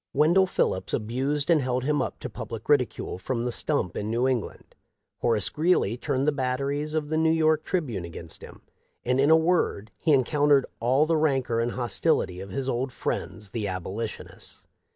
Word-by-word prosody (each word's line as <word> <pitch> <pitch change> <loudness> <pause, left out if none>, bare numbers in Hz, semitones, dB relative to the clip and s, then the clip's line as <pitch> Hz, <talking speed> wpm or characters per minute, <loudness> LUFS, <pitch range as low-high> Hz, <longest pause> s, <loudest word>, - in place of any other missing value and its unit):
Wendell 175 +5 +4
Phillips 95 - 0
abused 135 +8 -1
and 160 -3 +5
held 125 -1 -1
him 145 +1 +1
up - - -4
to - - -4
public 115 -1 -7
ridicule 125 -9 +1
from 120 +4 -2
the 125 - -1
stump 120 - -1
in 105 - -3
New 120 +3 +1
England. 125 -5 -3 0.5
Horace 115 -4 +2
Greeley 155 - +2
turned 135 +2 -1
the - - +5
batteries 140 +3 -1
of 150 -2 -1
the 155 - 0
New 160 0 +3
York 155 -1 +3
Tribune 135 - -2
against 85 -1 -8
him; - - -12 0.4
and, 125 +2 +1
in 140 +2 +4
a 160 - +8
word, 160 - +1
he 160 - +1
encountered 145 0 +4
all 130 +6 +3
the 165 0 +2
rancor 135 -6 +1
and 120 +1 0
hostility 110 -6 0
of 95 +1 -7
his 135 +2 -3
old 130 +1 -1
friends 105 -3 -4
the 110 -3 -2
Abolitionists. 95 +4 -5
130 Hz, 180 wpm, -26 LUFS, 115-150 Hz, 0.5 s, a